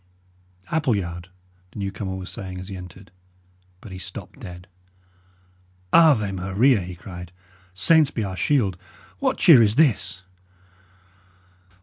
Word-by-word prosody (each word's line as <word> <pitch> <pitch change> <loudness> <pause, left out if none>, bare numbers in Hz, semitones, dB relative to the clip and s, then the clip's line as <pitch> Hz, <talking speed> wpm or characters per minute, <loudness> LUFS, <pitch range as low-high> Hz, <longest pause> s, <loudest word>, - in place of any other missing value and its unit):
"Appleyard" 100 - -1 0.4
the - - -14
newcomer 95 -1 -4
was 95 0 -6
saying, 95 -1 -7
as 95 +2 -8
he 100 - -6
entered; 90 +1 -11 0.7
but 105 - -11
he 95 - -7
stopped - - -8
dead. 90 +1 -10 1.3
"Ave 140 -12 +5
Maria!" 100 +6 +2
he 90 0 -7
cried. 90 0 -10 0.4
"Saints 155 - +4
be 115 - -3
our 95 -2 -4
shield! 100 - +1 0.4
What 270 -1 0
cheer 155 -10 +7
is 105 -1 +3
this?" 105 - +1
95 Hz, 120 wpm, -23 LUFS, 90-125 Hz, 1.3 s, cheer